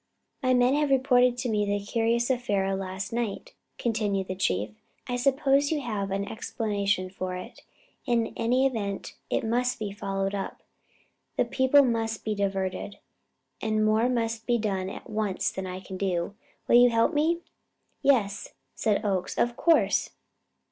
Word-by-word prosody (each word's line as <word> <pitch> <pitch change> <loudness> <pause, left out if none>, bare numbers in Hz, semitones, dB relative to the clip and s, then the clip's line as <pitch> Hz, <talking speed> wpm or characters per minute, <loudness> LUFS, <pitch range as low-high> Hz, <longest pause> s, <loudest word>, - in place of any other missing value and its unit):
"My 255 -2 +3
men 250 +1 +4
have 295 0 +2
reported 250 -2 +4
to 245 +1 -2
me 210 -2 +1
the 205 0 0
curious 235 +3 +1
affair 205 -6 0
of 195 0 -1
last 190 +2 -5
night," 235 -4 -3 0.2
continued 205 -5 -1
the 185 - -2
Chief. 105 - 0 0.4
"I 245 - -1
suppose 275 +2 +2
you 310 - +1
have 210 -6 -3
a 195 +1 -2
explanation 205 -4 -1
for 185 -1 -4
it; 180 - -9 0.5
in 235 -2 +1
any 250 +3 +2
event, 205 -7 -2 0.2
it - - 0
must 245 +2 0
be 210 -3 -4
followed 195 -1 -2
up. 195 -1 -5 0.7
The - - +3
people 260 +2 +4
must 225 -3 -1
be 215 - 0
diverted, 195 0 -2 0.6
and 215 -1 +1
more 220 +3 +3
must 230 -2 -1
be 240 -1 +3
done 195 -4 -1
at - - -9
once 210 -3 -1
than 190 0 -5
I 185 0 -5
can 190 0 -8
do. 185 -1 -1 0.3
Will 240 - +6
you 245 0 +7
help 230 -1 +2
me?" 325 +3 +2 0.6
"Yes," 220 -8 +1 0.2
said 215 0 0
Oakes. 190 -3 -1
"Of 240 0 +1
course!" 335 +4 +3
220 Hz, 160 wpm, -27 LUFS, 195-245 Hz, 0.7 s, you